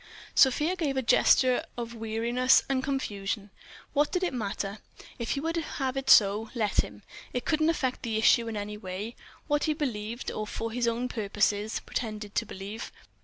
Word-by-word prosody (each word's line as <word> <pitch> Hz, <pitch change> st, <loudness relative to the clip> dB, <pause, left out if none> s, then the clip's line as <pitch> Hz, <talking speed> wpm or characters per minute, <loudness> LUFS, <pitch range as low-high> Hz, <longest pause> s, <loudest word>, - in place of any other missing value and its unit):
Sofia 300 Hz, +7 st, +4 dB
gave 295 Hz, -7 st, -1 dB
a 265 Hz, -, +1 dB
gesture 250 Hz, +2 st, +4 dB
of 235 Hz, -1 st, -4 dB
weariness 235 Hz, +3 st, +2 dB
and 265 Hz, -1 st, 0 dB
confusion. 205 Hz, -7 st, -3 dB, 0.4 s
What 290 Hz, 0 st, +2 dB
did 365 Hz, 0 st, 0 dB
it 355 Hz, -, 0 dB
matter? 200 Hz, -3 st, -3 dB, 0.4 s
If 235 Hz, -, -3 dB
he 275 Hz, -, -2 dB
would 330 Hz, +2 st, -1 dB
have 270 Hz, -5 st, -2 dB
it 270 Hz, 0 st, -2 dB
so, 210 Hz, 0 st, +6 dB
let 215 Hz, -4 st, 0 dB
him: 105 Hz, 0 st, -11 dB, 0.3 s
it 250 Hz, -, -2 dB
couldn't 310 Hz, 0 st, +2 dB
affect 260 Hz, -6 st, -1 dB
the 225 Hz, -3 st, -2 dB
issue 230 Hz, +1 st, +4 dB
in 225 Hz, -2 st, -3 dB
any 210 Hz, +1 st, -4 dB
way, 200 Hz, +4 st, -6 dB, 0.3 s
what 295 Hz, -1 st, +1 dB
he 310 Hz, -, +2 dB
believed, 235 Hz, -5 st, -3 dB
or 215 Hz, 0 st, -4 dB
for 225 Hz, +2 st, -4 dB
his 240 Hz, +1 st, 0 dB
own 235 Hz, +2 st, 0 dB
purposes 210 Hz, -1 st, 0 dB
pretended 215 Hz, -3 st, -4 dB
to 230 Hz, -, 0 dB
believe. 200 Hz, +4 st, -7 dB
230 Hz, 175 wpm, -28 LUFS, 210-265 Hz, 0.4 s, so